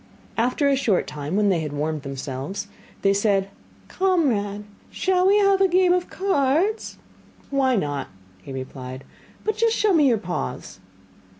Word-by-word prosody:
After 250 +5 +1
a 280 - +4
short 225 -9 +1
time, 150 +3 -5
when 205 0 +3
they 180 -4 +2
had 150 -2 -4
warmed 150 +1 -2
themselves, 135 +6 -5 0.4
they 195 0 +4
said: 200 -1 +1 0.4
'Comrade, 245 - 0 0.3
shall 370 0 +1
we 400 +2 +5
have 395 -1 +4
a 385 - +6
game 365 0 +4
of 360 0 -1
cards?' 375 +3 0 0.5
'Why 265 -2 +2
not?' 145 -8 -2 0.3
he 135 - -10
replied, 130 0 -7 0.4
'but 435 0 -1
just 460 0 +2
show 425 -2 +3
me 300 -4 +5
your 235 -3 +3
paws. 175 - -5
225 Hz, 155 wpm, -23 LUFS, -, 0.5 s, a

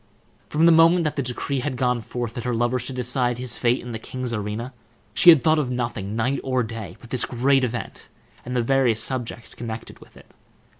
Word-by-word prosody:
From 155 +2 +2
the 170 - +7
moment 165 +2 +6
that 155 - -1
the 140 - 0
decree 130 +2 -3
had 130 0 -3
gone 125 -1 +1
forth 120 0 -5
that 120 - -5
her 125 -1 -1
lover 120 +2 +1
should 125 +2 -4
decide 125 -1 0
his 125 -1 -2
fate 120 0 +2
in 120 - -8
the 110 - -5
king's 125 +1 -5
arena, 110 +4 -4 0.4
she 175 - +7
had 160 -7 +8
thought 155 +2 +4
of 140 -4 -1
nothing, 120 -5 -3
night 125 +5 0
or 130 -2 0
day, 115 -2 -7
but 120 - -15
this 125 - +2
great 135 +2 +2
event 120 -1 -4 0.3
and 125 +1 -5
the 120 - +2
various 125 -3 +2
subjects 120 -3 -5
connected 115 -1 -7
with - - -18
it. - - -18
125 Hz, 215 wpm, -23 LUFS, 115-130 Hz, 0.4 s, had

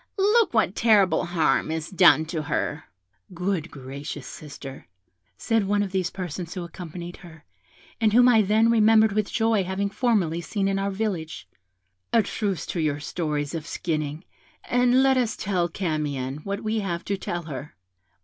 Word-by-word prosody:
Look 420 +3 +4
what 220 -5 +2
terrible 210 -5 +3
harm 170 -2 +1
is 160 0 -3
done 175 -4 +6
to 160 0 -3
her!' 150 +1 -2 0.5
'Good 180 -2 -2
gracious, 140 0 -7
sister,' 135 - -9 0.5
said 225 - +1
one 205 0 +2
of 195 - -5
these 185 -2 0
persons 175 -2 -6
who 180 - -4
accompanied 175 0 -8
her, 165 -4 -14 0.5
and 220 -2 +3
whom 245 +3 +6
I 230 -3 +6
then 215 +3 +3
remembered 220 -1 +5
with 210 0 -1
joy 225 -3 +2
having 190 +2 -2
formerly 200 -9 +1
seen 195 +3 -2
in 195 0 0
our 195 0 -1
village; 190 -6 -4 0.6
'a 230 -2 +4
truce 200 -4 -2
to 175 - -4
your 150 -2 0
stories 150 -1 -3
of 165 -1 -5
skinning, 155 -1 -3 0.4
and 245 +1 +3
let 265 -1 +4
us 240 -3 0
tell 180 -3 0
Camion 150 -7 -2
what 200 +6 -5
we 220 +1 0
have 175 -4 -3
to 200 - -1
tell 175 -2 -4
her.' 150 -2 -8
185 Hz, 165 wpm, -25 LUFS, 160-215 Hz, 0.6 s, done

